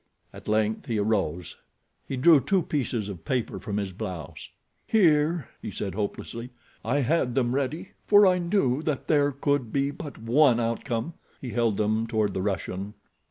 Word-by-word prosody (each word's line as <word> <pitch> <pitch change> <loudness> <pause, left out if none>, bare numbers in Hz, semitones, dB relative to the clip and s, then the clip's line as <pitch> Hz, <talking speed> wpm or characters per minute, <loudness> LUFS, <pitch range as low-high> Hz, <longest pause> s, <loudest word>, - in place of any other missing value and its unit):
At - - -12
length 110 0 0
he 115 - -1
arose. 95 -6 -1 0.5
He 135 - -3
drew 155 +3 +7
two 185 +7 +1
pieces 125 -9 -2
of 90 -5 -8
paper 125 +2 -2
from 105 -3 -4
his 100 -2 -3
blouse. 90 -6 -7 0.4
"Here," 160 - +3
he - - -5
said 100 -3 -4
hopelessly. 115 +4 -4 0.3
"I 135 +6 +1
had 130 -3 +1
them 125 -2 +1
ready, 140 +6 -2 0.2
for 205 0 +7
I 180 -1 +4
knew 170 -7 +1
that 150 -4 -3
there 145 -2 +3
could 140 -3 -1
be 140 0 0
but 145 0 -8
one 120 +2 +4
outcome." 115 +5 -2 0.3
He 125 - -6
held 115 -4 +1
them 110 +2 0
toward 110 -3 0
the 95 - -2
Russian. 100 +1 -3
120 Hz, 165 wpm, -26 LUFS, 105-145 Hz, 0.5 s, drew